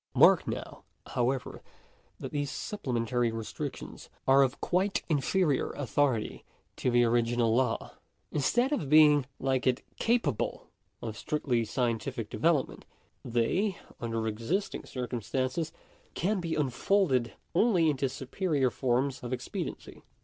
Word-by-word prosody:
Mark - - +6
now, - - -5 0.3
however, 125 +1 -1 0.6
that - - -6
these 145 -1 -1
supplementary 120 - -1
restrictions 115 -1 -6 0.2
are 135 +1 +7
of 135 -1 +1
quite 190 +3 0
inferior 155 0 +1
authority 135 -4 0 0.3
to - - 0
the 120 0 +4
original 120 -1 +2
law. 125 -1 0 0.4
Instead 240 - +2
of 150 - -2
being, 150 -3 +6
like 130 -1 0
it, 125 0 +1 0.2
capable 225 - 0 0.4
of 110 -2 -4
strictly 130 -3 0
scientific 115 0 -2
development, 145 +5 +1 0.4
they 145 - 0 0.2
(under 115 -1 -2
existing 115 - -2
circumstances) 130 +5 -2 0.4
can 200 +3 0
be 165 -2 -2
unfolded 135 - +1 0.2
only 180 -4 +4
into 135 -3 +1
superior 135 +1 -1
forms 130 +4 0
of 120 - -6
expediency. 130 - -5
130 Hz, 115 wpm, -30 LUFS, 120-155 Hz, 0.6 s, are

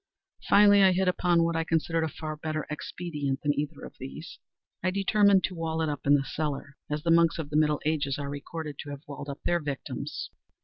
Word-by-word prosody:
Finally 205 0 +7
I 190 -1 +6
hit 190 +1 +1
upon 175 -2 +3
what 165 0 0
I 165 - +1
considered 165 0 0
a - - +1
far 155 0 -6
better 155 0 -3
expedient 150 -3 -3
than 145 -1 +2
either 150 +1 -4
of - - -12
these. 65 +2 -8 0.4
I 185 - +1
determined 200 0 +4
to 185 - -1
wall 165 -1 -2
it 160 - 0
up 145 -1 -4
in 145 - +7
the 135 -1 +1
cellar—as 150 0 -4
the 165 - +2
monks 165 0 +4
of 150 -3 -5
the - - -3
middle 150 -1 +3
ages 145 -3 0
are 145 -1 -4
recorded 145 +1 -6
to 145 - -6
have 140 0 -7
walled 145 0 -7
up 140 - -7
their 175 0 +2
victims. 145 -4 -5
155 Hz, 215 wpm, -28 LUFS, 145-170 Hz, 0.4 s, Finally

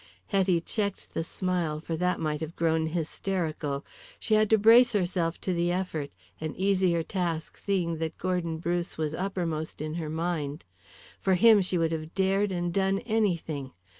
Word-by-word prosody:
Hetty 190 -4 +2
checked 200 +2 -3
the 165 - -1
smile, 175 -3 -1
for 165 +1 -4
that 180 +2 0
might 150 -1 -2
have 160 +1 -5
grown 160 -1 +1
hysterical. 160 -3 -2 0.3
She 220 - 0
had 215 -1 +4
to 220 - +6
brace 230 +3 +7
herself 175 -4 0
to 185 - -1
the 175 0 +1
effort, 175 -6 -2 0.3
an 155 -1 -4
easier 185 -3 +2
task 170 -4 -3
seeing 175 -5 -1
that 160 -1 -3
Gordon 175 -3 -1
Bruce 175 +1 -2
was 155 -1 -1
uppermost 170 -4 -3
in 155 +1 -4
her 160 -2 -3
mind. 160 -2 -2 0.5
For 190 -1 +2
him 220 +1 +7
she 185 -1 0
would 165 -1 +1
have 160 0 -5
dared 195 +1 +2
and 175 -1 -2
done 195 0 +2
anything. 170 - -1
175 Hz, 165 wpm, -28 LUFS, 160-190 Hz, 0.5 s, brace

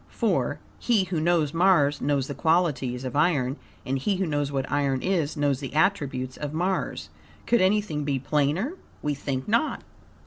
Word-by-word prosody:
for, - - 0 0.2
"he 225 -5 +2
who 175 -3 -2
knows 160 -3 +2
Mars 165 -5 +3
knows 140 -2 +1
the 140 - -5
qualities 145 -5 +1
of 130 0 -5
iron, 145 -4 +2 0.3
and 135 +1 -1
he 200 +9 0
who 190 +1 0
knows 145 -3 -1
what 135 -1 -2
iron 140 -2 +1
is 170 -5 0
knows 145 -3 +1
the 135 0 -7
attributes 140 -8 0
of 150 0 -5
Mars." 185 +3 -1 0.4
Could 240 - +3
anything 190 -6 +1
be 140 -1 0
plainer? 150 - 0 0.3
We 150 - 0
think 135 -2 -4
not. 230 +8 +1
150 Hz, 170 wpm, -26 LUFS, 140-180 Hz, 0.4 s, Mars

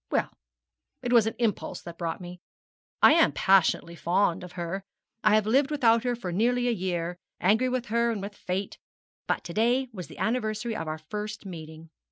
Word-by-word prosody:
Well, - - 0 0.7
it 245 0 0
was 230 -2 +6
an 225 - -2
impulse 230 -4 -1
that 170 -1 -9
brought 165 -2 -2
me. 175 0 -9 0.6
I - - +9
am 330 0 +4
passionately 185 -3 +3
fond 175 +1 +1
of 180 0 -10
her. 175 +2 -4 0.4
I 215 0 +5
have 215 -1 +3
lived 270 +6 +3
without 235 -6 +3
her 245 -1 +1
for 190 -7 -5
nearly 245 +6 +1
a - - +3
year 175 -4 -2 0.2
angry 220 +7 +3
with 250 -1 -1
her 235 +1 +2
and 225 -3 -1
with 200 +1 -6
fate 190 +1 -4 0.5
but - - 0
to 170 - -7
day 245 +5 +2
was 185 -4 -7
the - - -13
anniversary 220 -1 -1
of 165 -5 -4
our 155 0 -3
first 210 +7 -6
meeting. 160 -3 -9
210 Hz, 195 wpm, -27 LUFS, 175-235 Hz, 0.7 s, I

